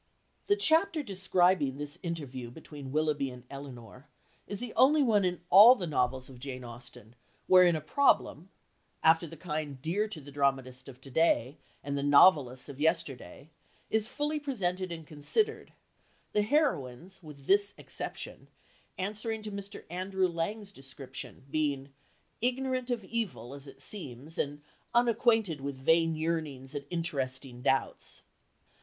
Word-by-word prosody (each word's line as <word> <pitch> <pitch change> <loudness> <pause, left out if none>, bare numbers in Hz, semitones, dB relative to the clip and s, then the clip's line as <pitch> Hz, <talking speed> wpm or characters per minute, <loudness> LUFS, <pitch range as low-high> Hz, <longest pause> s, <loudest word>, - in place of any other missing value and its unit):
The 405 - +4
chapter 325 -4 +2
describing 185 - +2
this 145 0 -6
interview 140 -8 -5
between 145 0 -10
Willoughby 150 -2 0
and 125 -1 -11
Elinor 135 -1 -10 0.4
is 205 - -5
the 245 -2 -5
only 290 +3 +5
one 215 -5 +3
in 180 -1 -1
all 220 +6 +10
the 190 - -4
novels 130 -4 0
of 130 -2 -12
Jane 130 -1 -6
Austen 120 -2 -12 0.3
wherein 180 -2 +6
a 155 - -2
"problem," 180 - +2 0.5
after 165 +1 +5
the 165 - -11
kind 150 -4 -4
dear 180 +10 0
to 210 -7 -6
the 145 0 -12
dramatist 135 -2 -1
of 125 -1 -12
to 135 - -11
day 140 -3 +2 0.2
and 140 0 -3
the 140 - -1
novelists 140 -3 +5
of 140 -2 -9
yesterday, 145 - -1 0.4
is 220 0 +2
fully 300 +3 -1
presented 190 -10 -2
and 165 -2 -7
considered, 420 - -1 0.6
the 210 - +2
heroines, 190 - 0
with 150 -4 -12
this 200 +3 +3
exception, - - -5 0.5
answering 215 +3 -3
to 215 - -6
Mr. 200 0 -7
Andrew 185 +1 0
Lang's 195 +5 -3
description, 135 -5 -9
being 140 -3 -1 0.5
"ignorant 255 +1 -1
of 235 -5 -2
evil, 185 - -3
as 140 0 -11
it 135 - -13
seems, 150 - -5
and 145 +1 -2 0.3
unacquainted 225 - +3
with 140 0 -4
vain 165 +4 +3
yearnings 155 -5 -3
and 145 -1 -5
interesting 135 -7 -3
doubts." 135 +1 -1
160 Hz, 145 wpm, -30 LUFS, 135-200 Hz, 0.6 s, all